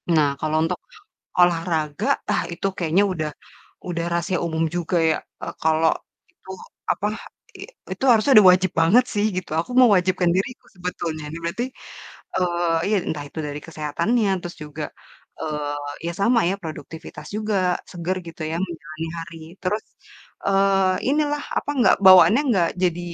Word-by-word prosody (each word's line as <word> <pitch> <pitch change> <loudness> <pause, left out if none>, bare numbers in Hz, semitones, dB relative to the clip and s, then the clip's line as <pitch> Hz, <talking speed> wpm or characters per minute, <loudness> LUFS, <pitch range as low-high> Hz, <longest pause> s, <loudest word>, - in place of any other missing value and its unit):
Nah, 155 -3 +4
kalau 155 0 0
untuk 180 +2 -2 0.6
olahraga, 165 -4 +1 0.2
ah - - +1
itu 170 +3 -5
kayaknya 175 +3 +2
udah 155 -4 -2 0.6
udah 170 -2 -2
rahasia 170 +2 0
umum 160 -1 -1
juga 175 +1 -1
ya, 160 - +3 0.3
eee, - - -5
kalau 160 0 +3 0.4
itu - - -20 0.4
apa, 205 - -1 0.5
i 380 - -11 0.3
itu - - -9
harusnya 230 +3 +4
udah 205 -3 +9
wajib 185 0 +2
banget 200 +10 +5
sih 205 -1 +1
gitu, 185 - -4
aku 170 - -4
mewajibkan 185 -6 +4
diriku 200 +7 -3
sebetulnya. 175 -3 -4
Ini 165 - -6
berarti, 170 +8 -2 0.8
eee, 175 -2 +1
iya 210 +1 +2
entah 150 -2 -3
itu 150 - -10
dari 145 0 -5
kesehatannya, 165 +9 0
terus 175 0 -7
juga, 150 +1 -7 0.6
eee, 150 -1 -3 0.3
ya 170 - -2
sama 230 +4 +4
ya, 190 - +1
produktivitas 160 0 -8
juga, 215 0 -2 0.4
seger 175 +1 -3
gitu 165 0 -11
ya 165 - -2
menjalani 160 -1 -7
hari 165 0 -8 0.2
terus, 205 +3 -1 0.6
eee, 195 -1 +3 0.2
inilah 295 0 +1 0.2
apa - - -3
enggak 250 - +5
bawaannya 185 - +8
enggak 185 -8 +3
jadi 175 -1 +1
175 Hz, 150 wpm, -23 LUFS, 160-195 Hz, 0.8 s, udah